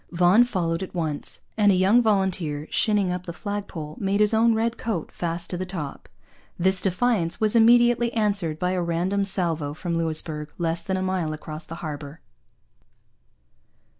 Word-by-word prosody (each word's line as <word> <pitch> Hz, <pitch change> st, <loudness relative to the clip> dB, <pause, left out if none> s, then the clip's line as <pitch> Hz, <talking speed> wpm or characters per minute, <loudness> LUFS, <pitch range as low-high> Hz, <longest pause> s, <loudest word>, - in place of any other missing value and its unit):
Vaughan 180 Hz, +6 st, +5 dB
followed 180 Hz, -7 st, -1 dB
at 190 Hz, -, -7 dB
once; 155 Hz, -4 st, -3 dB, 0.2 s
and 205 Hz, -2 st, +5 dB
a -, -, +3 dB
young 195 Hz, +6 st, +4 dB
volunteer, 185 Hz, -8 st, 0 dB
shinning 205 Hz, -4 st, +2 dB
up 180 Hz, 0 st, -5 dB
the -, -, -3 dB
flag 205 Hz, +3 st, -5 dB
pole, 155 Hz, -3 st, -7 dB
made 200 Hz, +1 st, 0 dB
his 210 Hz, +1 st, +4 dB
own 225 Hz, +1 st, +4 dB
red 230 Hz, +1 st, 0 dB
coat 205 Hz, -9 st, -4 dB
fast 170 Hz, 0 st, -3 dB
to 180 Hz, -, -2 dB
the 185 Hz, -, -3 dB
top. 160 Hz, -7 st, -6 dB, 0.5 s
This 190 Hz, +1 st, +2 dB
defiance 190 Hz, -2 st, 0 dB
was 215 Hz, +1 st, +1 dB
immediately 240 Hz, +1 st, +5 dB
answered 200 Hz, -8 st, 0 dB
by 180 Hz, +2 st, -1 dB
a 185 Hz, -1 st, 0 dB
random 175 Hz, +4 st, 0 dB
salvo 165 Hz, -6 st, 0 dB
from 170 Hz, +1 st, -3 dB
Louisbourg, 155 Hz, -2 st, -2 dB
less 170 Hz, -1 st, -1 dB
than 190 Hz, -1 st, -2 dB
a 185 Hz, -, -2 dB
mile 185 Hz, -4 st, -1 dB
across 155 Hz, +1 st, -8 dB
the 165 Hz, -, -7 dB
harbour. 145 Hz, 0 st, -7 dB
180 Hz, 170 wpm, -24 LUFS, 165-205 Hz, 0.5 s, Vaughan